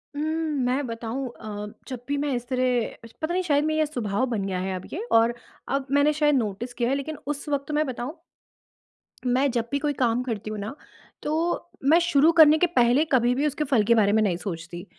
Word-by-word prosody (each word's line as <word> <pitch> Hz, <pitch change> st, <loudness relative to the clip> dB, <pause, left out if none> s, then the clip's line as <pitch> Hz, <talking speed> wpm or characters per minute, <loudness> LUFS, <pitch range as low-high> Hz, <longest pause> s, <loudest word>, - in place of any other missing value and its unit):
उम, 290 Hz, -, -3 dB, 0.4 s
मैं 260 Hz, +3 st, 0 dB
बताऊँ 230 Hz, +3 st, -4 dB
अ, 210 Hz, -1 st, -6 dB, 0.2 s
जब 255 Hz, -3 st, -7 dB
भी 285 Hz, -, 0 dB
मैं 285 Hz, -1 st, -1 dB
इस 240 Hz, 0 st, -5 dB
तरह 250 Hz, -3 st, -1 dB
श -, -, -19 dB
पता 315 Hz, +2 st, -1 dB
नहीं 370 Hz, +1 st, 0 dB
शायद 290 Hz, -4 st, +2 dB
मेरा 310 Hz, 0 st, 0 dB
ये 310 Hz, -, +3 dB
स्वभाव 245 Hz, -5 st, -1 dB
बन 210 Hz, -5 st, -1 dB
गया 190 Hz, -2 st, -2 dB
है 190 Hz, +1 st, -2 dB
अब 185 Hz, -, -7 dB
ये 375 Hz, +8 st, -3 dB
और 230 Hz, +1 st, +4 dB, 0.3 s
अब 275 Hz, -1 st, -1 dB
मैंने 285 Hz, +2 st, +4 dB
शायद 295 Hz, -1 st, +3 dB
नोटिस 230 Hz, 0 st, -2 dB
किया 240 Hz, 0 st, 0 dB
है। 270 Hz, -, +2 dB
लेकिन 290 Hz, +2 st, -4 dB
उस 290 Hz, 0 st, -4 dB
वक़्त 285 Hz, 0 st, -2 dB
मैं 300 Hz, +1 st, +1 dB
बताऊँ 260 Hz, +5 st, -5 dB, 1.1 s
मैं 260 Hz, +3 st, +3 dB
जब 235 Hz, -1 st, -1 dB
भी 280 Hz, -, 0 dB
कोई 295 Hz, 0 st, 0 dB
काम 245 Hz, -2 st, +1 dB
करती 220 Hz, -4 st, -4 dB
हूँ 215 Hz, -1 st, -5 dB
ना, 210 Hz, +6 st, -5 dB, 0.5 s
तो 330 Hz, +3 st, -1 dB
मैं 310 Hz, +5 st, +5 dB
शुरू 330 Hz, -2 st, +4 dB
करने 315 Hz, -2 st, +7 dB
के 355 Hz, -, +3 dB
पहले 245 Hz, +4 st, +4 dB
कभी 245 Hz, -2 st, +4 dB
भी 280 Hz, +3 st, 0 dB
उसके 300 Hz, +1 st, -2 dB
फल 260 Hz, -7 st, +2 dB
के 235 Hz, +3 st, +4 dB
बारे 205 Hz, -3 st, +4 dB
में 220 Hz, -, +4 dB
नहीं 185 Hz, -5 st, +1 dB
सोचती। 175 Hz, -1 st, -6 dB
255 Hz, 225 wpm, -25 LUFS, 225-295 Hz, 1.1 s, करने